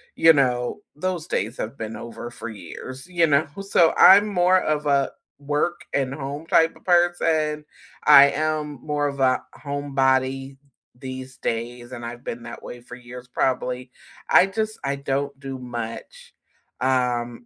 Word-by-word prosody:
you 165 0 +7
know, 125 +2 0 0.2
those 180 -1 -3
days 110 +5 -2
have 115 +4 -5
been 110 0 -5
over 115 0 -8
for 120 0 -8
years, 115 - -9
you 175 -2 +2
know? 150 0 +2
So, 175 -4 +3
I'm 200 +3 +8
more 185 -2 +3
of 150 -3 -1
a 140 -2 +2 0.3
work 150 +5 -2
and 135 -1 0
home 140 +2 -6
type 165 0 +3
of - - -19
person, 165 -4 +2 0.4
I 140 -1 +9
am 150 -2 -2
more 145 -1 0
of 140 -1 -4
a 130 -1 +3 0.2
homebody 135 -1 0 0.4
these 130 +1 -8
days 120 +2 -4
and 120 -1 -7
I've 120 +1 -8
been 115 0 -5
that - - -9
way 120 - -9
for 125 +1 -11
years, 125 0 -11
probably. 125 0 -1 0.4
I 185 - +6
just 215 +2 -3
I 140 0 -1
don't 140 0 -3
do 135 -1 -6
much, 120 -3 -7 0.5
um, 125 -2 0
135 Hz, 155 wpm, -23 LUFS, 125-155 Hz, 0.5 s, I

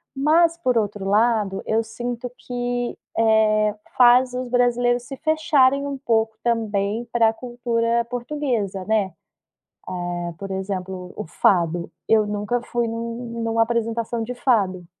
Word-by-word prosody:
Mas 325 +4 +3
por 255 -8 +1
outro 205 -2 -1
lado, 210 -1 +2
eu 225 +1 +1
sinto 240 +2 -5
que, 245 -1 -3 0.2
eh, 215 -1 +3 0.2
faz 250 0 +6
os 255 0 -3
brasileiros 245 0 +2
se 270 +2 -8
fecharem 295 -3 +3
um 280 -1 -4
pouco 225 -4 0
também 220 -2 0
para 225 -2 +3
cultura 235 -1 -1
portuguesa, 240 -6 -3
né. 210 -2 +1 1.0
Hã, 175 -1 -4
por 195 0 -7
exemplo 190 -1 -4
o - - -5
fado, 170 0 +1 0.2
eu 220 -1 +5
nunca 210 +3 -1
fui 240 -1 -1
em - - -3
uma 230 +1 -5
em 230 - -1
uma 225 0 +3
apresentação 230 0 -1
de 245 +3 -4
fado. 195 -9 +1
230 Hz, 140 wpm, -22 LUFS, 210-245 Hz, 1.0 s, faz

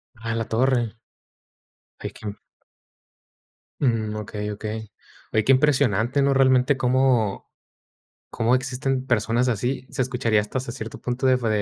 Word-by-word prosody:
Ah, 115 0 -5
en 115 - -1
la 115 - -2
torre. 120 -1 +1 1.0
Hay - - -5
que - - -13
m 100 - -5 1.5
Mm, 110 -4 +1
okey, 105 0 -4
okey. 110 +1 -6 0.4
Oye, 110 - +3
qué 130 - +4
impresionante, 130 -2 +3
¿no?, 140 0 +3
realmente 130 +1 +4
cómo 125 -5 +1 0.8
cómo 115 +2 +2
existen 130 0 -2
personas 115 +1 +1
así. 125 +4 -2
Se - - -1
escucharía 120 -4 +1
hasta 105 +5 -2
c 130 - -6
cierto 115 -3 -7
punto 125 +2 -1
de 130 -1 +5
fu 120 - -2
120 Hz, 145 wpm, -24 LUFS, 110-130 Hz, 1.5 s, de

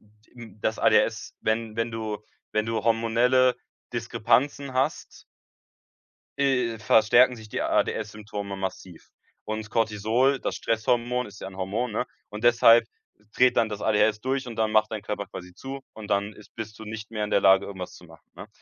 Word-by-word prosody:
d 105 +1 -29
im 115 -3 -12
das 110 - 0
ADHS, - - +2
wenn 110 0 -1
wenn 115 0 -1
du 110 -2 -4 0.3
wenn 110 0 +1
du 115 -2 -1
hormonelle 120 +3 +3 0.4
Diskrepanzen 140 0 0
hast 135 +4 -2 1.2
äh, 125 -5 +1
verstärken 115 +3 +5
sich 110 -2 -12
die - - -3
ADS 105 -1 0
Symptome 105 -2 -6
massiv. 95 -2 -6 0.4
Und 110 0 -4
Cortisol, 115 +5 +2
das - - -3
Stresshormon, 120 +2 0
ist 105 0 -13
ja 95 - -6
'n 95 - -13
Hormon, 105 +6 -2
ne? 120 +4 -2 0.2
Und 105 +2 -8
deshalb 120 -1 +6 0.5
dreht 125 0 +4
dann 110 - +3
das 105 -1 -6
ADHS 105 0 +2
durch 130 +1 -2
und 115 - -6
dann 110 -1 0
macht 110 0 +2
dein 105 - -4
Körper 100 -1 -4
quasi 90 -1 -10
zu 135 +1 -7
und 110 -2 -9
dann 100 +1 0
ist 105 - -17
bist 110 -2 -7
du 110 - -9
nicht 110 0 -7
mehr 105 -2 -2
in 105 - -5
der - - +3
Lage, 95 0 +5
irgendwas 95 -2 -7
zu 90 - -14
machen, 80 -3 -18
ne? - - -9
110 Hz, 180 wpm, -26 LUFS, 105-120 Hz, 1.2 s, deshalb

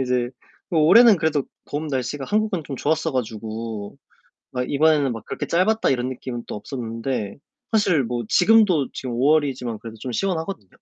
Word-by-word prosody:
이제 125 -1 0 0.4
뭐 165 - +2
올해는 225 +6 +7
그래도 155 -4 0 0.3
봄 150 +2 -3
날씨가 135 0 -3
한국은 210 -5 0
좀 140 - -6
좋았어 160 +2 0
가지고 110 -3 -4 0.6
막 125 0 -3
이번에는 145 -2 +3
막 115 -2 -7
그렇게 - - -4
짧았다 215 +6 +2
이런 130 -1 0
느낌은 125 -2 -6
또 - - -5
없었는데 115 0 -4 0.3
사실 185 -10 +3
뭐 120 0 -3
지금도 185 - +4
지금 130 - -5
5월이지만 130 -5 +1
그래도 115 -1 -9
좀 130 - -5
시원하거든요. 165 - -2
135 Hz, 370 characters per minute, -23 LUFS, 120-160 Hz, 0.6 s, 올해는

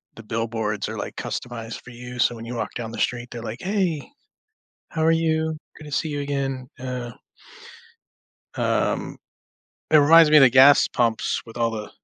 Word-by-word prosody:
the 115 - -11
billboards 110 -2 -3
are, - - -6
like, - - -6
customized 115 -2 -6
for 125 - -12
you, 125 +1 -9
so 120 - +2
when 115 0 -9
you 120 +1 -6
walk - - -4
down 115 -2 -5
the - - -7
street, 125 0 -1
they're 120 - -7
like, 115 +2 -6
'Hey, 185 -6 -1 0.8
how 160 -1 -2
are 165 - +5
you, 160 -1 0 0.2
good 155 - -12
to 150 - -10
see 155 +2 -1
you, 145 -1 -3
again,'" 135 -2 -3
uh 125 -2 -5 1.5
um, - - -1 0.7
it 155 - +6
reminds 160 +2 +7
me 155 - +7
of 145 - +8
the 130 - +7
gas 135 +3 +7
pumps, 115 -2 0
with 115 - -12
all 115 -1 +1
the 105 -2 -6
125 Hz, 185 wpm, -23 LUFS, 115-150 Hz, 1.5 s, of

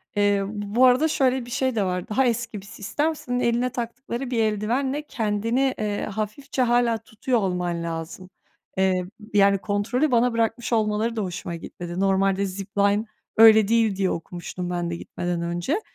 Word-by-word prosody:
Eee, 205 -1 +2
bu 210 +4 +1
arada 255 +5 +5
şöyle 260 -4 +1
bir 240 - -11
şey 260 0 0
de 210 - +1
var, 180 -1 -2
daha 260 +5 +2
eski 230 -3 -2
bir - - -15
sistem, 290 +11 -2
senin 245 -4 -3
eline 240 +1 +1
taktıkları 245 +1 -5
bir 235 - 0
eldivenle 240 +7 0
kendini, 230 +4 0
eee, 210 -1 -1
hafifçe 215 +6 -3
hâlâ 240 -1 +3
tutuyor 225 +2 -2
olman 180 -3 -1
lazım. 165 +3 -6 0.5
Eee, 185 -1 +2 0.3
yani, 200 -1 +5
kontrolü 220 +9 0
bana 240 0 +3
bırakmış 230 +1 -1
olmaları 220 +1 +1
da 220 - -1
hoşuma 175 -1 -5
gitmedi. 175 +1 -7
Normalde 195 0 +2
zipline 200 +2 0 0.3
öyle 220 -2 +8
değil 225 -3 +2
diye 190 -1 +1
okumuştum 175 +1 -5
ben 175 -1 -2
de 170 - -3
gitmeden 175 0 -4
önce. 175 - -1
215 Hz, 160 wpm, -24 LUFS, 195-240 Hz, 0.5 s, öyle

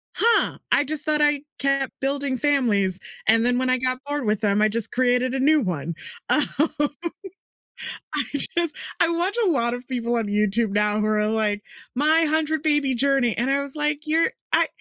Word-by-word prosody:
"Huh, 465 +1 +2
I - - +4
just 300 +1 -4
thought 305 -1 +1
I 295 -1 +2 0.2
kept 275 -1 0
building 275 -1 -1
families, 225 -10 +2 0.3
and 225 +1 +4
then 245 0 +2
when 255 0 0
I 255 - +3
got 255 0 -2
bored 290 -2 -2
with 210 -1 0
them, 205 -1 +2
I 215 - +5
just 225 0 +1
created 250 0 +1
a 270 - -1
new 300 +2 +4
one." 170 - -3 0.4
Um, 300 - +4 1.7
I 295 - +2 0.3
just 335 -3 0 0.2
I 335 - +3
watch 345 +5 -1
a 375 - +3
lot 235 -6 +1
of 245 0 -7
people 240 -2 -2
on 230 -2 0
YouTube 210 +1 +1
now 210 +1 +1
who 210 - 0
are 210 0 +1
like, 215 -1 0 0.3
"My 310 +5 +3
hundred-baby 305 -3 +1
journey," 270 -2 +2
and 245 +3 0
I 280 +1 +1
was 280 0 -4
like, 300 -1 -1
"You're 325 +7 +2 0.2
I - - +4
260 Hz, 185 wpm, -23 LUFS, 225-295 Hz, 1.7 s, I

